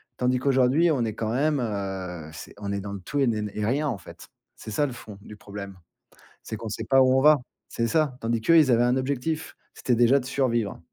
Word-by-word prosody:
tandis 125 0 +1
qu'aujourd'hui, 135 +5 +3
on 135 -6 +1
est 110 -2 -3
quand 110 -1 -2
même, 145 +3 +1
heu, 95 -7 -4
c'est 80 - -10
on 100 -1 -5
est 100 - -2
dans 100 0 -6
le 100 - -7
tout 145 +10 -3
et 140 - +4
n 105 -3 -1
et 105 - -2
rien, 145 +6 0
en 115 - -3
fait. - - -13 0.3
C'est 110 - -9
ça 145 +7 +1
le 130 - -5
fond 105 -4 -11
du 105 - -11
problème, 100 -1 -9 0.7
c'est - - -6
qu'on 110 +1 -6
sait 105 - -5
pas 135 0 +4
où 130 0 +4
on - - +5
va, 150 +1 +7 0.3
c'est 115 - -2
ça. 150 +1 +1
Tandis 115 0 0
qu'eux, 165 +10 +4
ils 150 -5 +5
avaient 120 0 +4
un 125 +1 +2
objectif, 140 +4 -2 0.2
c'était 125 - 0
déjà 120 +4 +4
de - - -11
survivre. 120 -6 -1
120 Hz, 240 wpm, -25 LUFS, 105-135 Hz, 0.7 s, va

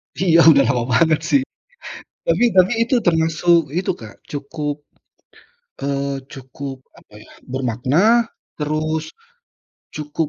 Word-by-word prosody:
Iya, 170 -3 +3
udah 140 -4 +7
lama 125 -1 +1
banget 160 +4 +3
sih. 280 - +4 0.9
Tapi 370 - +2
tapi 185 +4 +5
itu 235 +3 0
termasuk 165 -1 +2
itu 185 - -1
Kak 110 -3 -11 0.2
cukup, 145 0 -4 1.1
eee, 140 0 -2
cukup, 135 +1 -8 0.2
apa - - -26
ya, - - -19 0.2
bermakna 135 - +1 0.3
terus 155 +1 -2 0.9
cukup 150 +1 -3
150 Hz, 110 wpm, -20 LUFS, 140-170 Hz, 1.1 s, udah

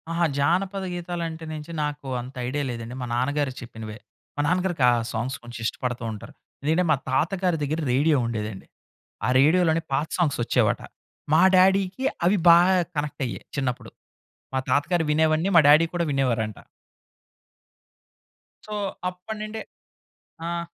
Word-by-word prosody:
అహా! 170 +1 +1
జానపద 185 +7 +1
గీతాలంటే 170 -2 -4
నించి 155 +1 -7
నాకు 150 -1 -4
అంత 125 +2 -10
ఐడియా 145 +3 -1
లేదండి. 115 0 -6
మా - - -2
నాన్నగారు 140 +2 0
చెప్పినవే. 110 -3 -8 0.4
మా 145 - 0
నాన్నగారికి 180 -3 0
ఆ - - +4 0.2
సాంగ్స్ 125 +4 -3
కొంచెం 120 -1 -9
ఇష్టపడుతూ 125 +1 -3
ఉంటరు. 105 - -9 0.3
ఎందుకంటే 160 +5 +2
మా - - +5
తాతగారి 175 +6 +1
దగ్గర 155 +3 -1
రేడియో 145 +3 +3
ఉండేదండి. 105 -4 -5 0.6
ఆ - - +1
రేడియో‌లోనే 160 +3 +4
పాత 145 +4 +1
సాంగ్స్ 160 -8 +1
ఒచ్చేవట. - - +1 0.5
మా 160 - +6
డ్యాడీ‌కి 190 +5 +3 0.2
అవి 195 +4 +4
బాగా 175 +3 +6 0.2
కనెక్ట్ 145 0 -3
అయ్యేవి 120 - -6
చిన్నప్పుడు. 130 -3 -2 0.6
మా - - +2
తాతగారు 165 +4 +2
వినేవన్నీ 160 +3 +2
మా - - +10
డ్యాడీ 155 +3 +7
కూడా 175 -1 +1
వినేవారంట. 115 -6 0 2.1
సో, 215 - -6 0.4
అప్పటినుండే 215 +4 -6 0.9
ఆ! 170 0 -2
155 Hz, 135 wpm, -25 LUFS, 130-175 Hz, 2.1 s, మా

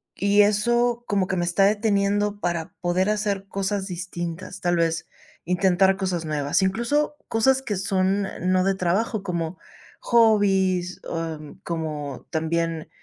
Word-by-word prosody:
Y 200 +1 +4
eso 240 +4 +2
como 200 -3 +1
que 190 - -1
me 175 - 0
está 175 +3 +3
deteniendo 205 -1 +1
para 170 -3 -2
poder 180 +3 +1
hacer 205 -2 -1
cosas 195 0 -2
distintas, 175 0 -6
tal 175 -1 +1
vez, 165 -1 0 0.4
intentar 190 +2 +3
cosas 185 -4 -2
nuevas. 150 +1 0
Incluso 235 +11 0
cosas 265 +4 +2
que 225 -6 -3
son 195 +1 +1
n 185 - -7
no 185 0 +3
de 195 0 +1
trabajo, 195 +4 0
como 170 -2 -3 0.4
hobbies, 195 -6 +3
am, 160 -2 -5
como 150 -5 -4
también, 165 0 -1
190 Hz, 140 wpm, -24 LUFS, 170-205 Hz, 0.4 s, Y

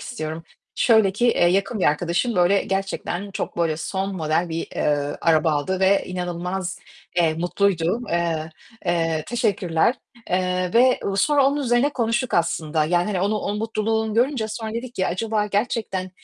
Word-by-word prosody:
istiyorum. 160 - -5 0.3
Şöyle 220 -5 +4
ki, 240 +5 +1
eee, 175 -6 +3
yakın 195 +4 +1
bir - - +2
arkadaşım, 175 +10 +1
böyle, 180 +3 +4
gerçekten 195 0 -3
çok, 205 - -5
böyle, 165 -2 +1
son 190 +5 -3
model 160 +1 0
bir, 165 0 -3
eee, 145 -1 0
araba 160 -1 +3
aldı 185 +6 -1
ve 195 +1 +3
inanılmaz, 180 +1 -4 0.4
eee, 165 -3 +3
mutluydu. 175 +3 0
Eee, 165 -2 -1 0.4
eee 165 -2 0
Teşekkürler, 200 -4 +1 0.4
eee, 180 0 0
ve 250 +2 +5 0.2
sonra 280 +6 +4
onun 280 +1 +1
üzerine 250 -1 +2
konuştuk 235 0 -1
aslında. 160 -2 +1
Yani, 175 +2 +2
hani, 200 -4 -1
onu, 205 +3 +1
o 205 - -3
mutluluğunu 220 0 -1
görünce 240 -1 +1
sonra 220 0 -5
dedik 240 +1 -5
ki 185 - 0
"Acaba 215 +3 -1
gerçekten, 205 -3 -2
190 Hz, 155 wpm, -23 LUFS, 170-220 Hz, 0.4 s, ve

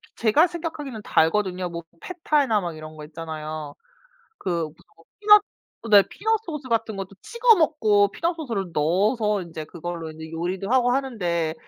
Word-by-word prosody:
제가 235 +10 +4
생각하기에는 310 -9 -6
달거든요. 185 +1 +1
뭐 170 0 -6 0.2
팻타이나 290 - +1
막 170 -2 -4
이런 155 0 -10
거 150 - -9
있잖아요. 155 -2 -6 0.6
그 170 -3 -1
무슨 155 - -11 0.2
뭐 165 - -22
피넛 420 0 +7 0.5
네. 200 -1 +9
피넛 445 +1 0
소스 300 -6 -6
같은 225 -2 0
것도 195 -1 -5
찍어 470 -1 +4
먹고 215 - +3
피넛 335 - -1
소스를 230 - -3
넣어서 205 - +1
인제 160 -3 -7
그걸로 170 0 -6
인제 160 +1 -10
요리도 180 +5 -3
하고 250 -1 +4
하는데 180 -12 -1
200 Hz, 345 characters per minute, -24 LUFS, 165-270 Hz, 0.6 s, 네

